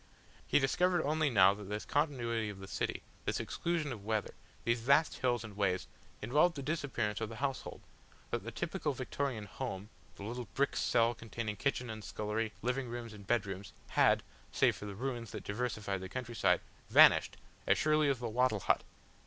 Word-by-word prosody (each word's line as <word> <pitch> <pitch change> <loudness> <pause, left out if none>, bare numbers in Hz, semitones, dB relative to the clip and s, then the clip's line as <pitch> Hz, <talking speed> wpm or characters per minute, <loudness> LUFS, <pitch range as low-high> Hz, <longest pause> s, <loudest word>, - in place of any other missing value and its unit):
He - - +4
discovered 175 +5 +2
only 155 0 +2
now 100 -5 +6
that 105 0 -8
this 105 +2 -4
continuity 120 -7 0
of 100 - -7
the 95 0 -9
city, - - -2 0.2
this - - 0
exclusion 165 -4 -1
of 110 -5 -6
weather, 110 -1 -1 0.3
these 115 0 +1
vast 140 +6 +3
halls 120 -3 +1
and 110 -3 -9
ways, 95 -3 0 0.4
involved 150 +10 +3
the 140 - -5
disappearance 130 -9 -1
of 110 - -2
the 115 - -7
household; 135 +2 -3 0.5
that - - -1
the - - -5
typical - - -2
Victorian 130 -7 -3
"Home," 105 -2 -5 0.3
the - - -9
little 120 +2 -5
brick 140 0 +1
cell 115 -1 +3
containing 115 -1 -5
kitchen 125 +2 -1
and 110 -1 -7
scullery, 110 +2 -2
living 125 +1 -1
rooms 120 -1 -6
and 100 -2 -12
bedrooms, 100 -4 -1 0.2
had, - - +4 0.3
save - - +3
for 105 - -7
the 100 - -6
ruins 120 -1 -3
that - - -5
diversified 105 -3 -2
the 95 - -6
countryside, 120 +1 +1 0.3
vanished - - +7 0.3
as - - +5
surely 155 -1 +3
as 135 - +2
the 120 0 -4
wattle 115 -2 +2
hut. - - +3
115 Hz, 180 wpm, -34 LUFS, 105-135 Hz, 0.5 s, vanished